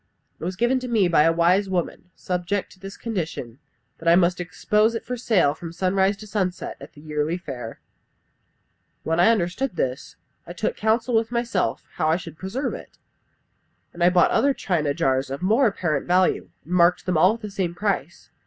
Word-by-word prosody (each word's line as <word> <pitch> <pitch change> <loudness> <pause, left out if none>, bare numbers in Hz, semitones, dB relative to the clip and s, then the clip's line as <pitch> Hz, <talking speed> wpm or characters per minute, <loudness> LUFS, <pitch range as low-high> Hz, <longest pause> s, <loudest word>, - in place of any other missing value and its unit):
It - - -10
was 180 +2 -3
given 240 +6 +2
to 255 - -6
me 220 -6 +3
by 165 -3 +4
a 165 - +5
wise 180 +4 +2
woman, 180 0 -3
subject 180 +2 -2
to 185 - -18
this 195 +1 -9
condition, 160 - -5 0.4
that 165 - -7
I 170 - +7
must 175 0 +3
expose 210 +5 +1
it 230 - -5
for 250 - -3
sale 210 -11 +2
from 165 +1 -8
sunrise 190 +3 +1
to 215 - -10
sunset 190 -4 -3
at - - -11
the 145 - -15
yearly 150 +2 -2
fair. 125 -10 -8 1.2
When 165 +1 0
I 180 - +6
understood 220 +3 0
this 130 -5 -3 0.3
I 175 - -7
took 180 - -2
counsel 225 +3 0
with 225 0 +1
myself 235 -5 -1
how 155 - +1
I 160 - +3
should 165 -3 -10
preserve 215 +9 -3
it; - - -10 1.0
and 170 - -2
I 175 - +7
bought 180 -1 +4
other 280 -1 +2
china 155 -6 -1
jars 130 0 +1
of 140 +5 -5
more 225 +7 +4
apparent 155 -8 -1
value, 180 +1 +2
and 165 - -13
I - - +3
marked 175 +1 +4
them 185 - 0
all 185 +6 +5
with 230 - -9
the 210 - -6
same 180 -3 -2
price. 175 -5 -3
180 Hz, 200 wpm, -23 LUFS, 165-210 Hz, 1.2 s, I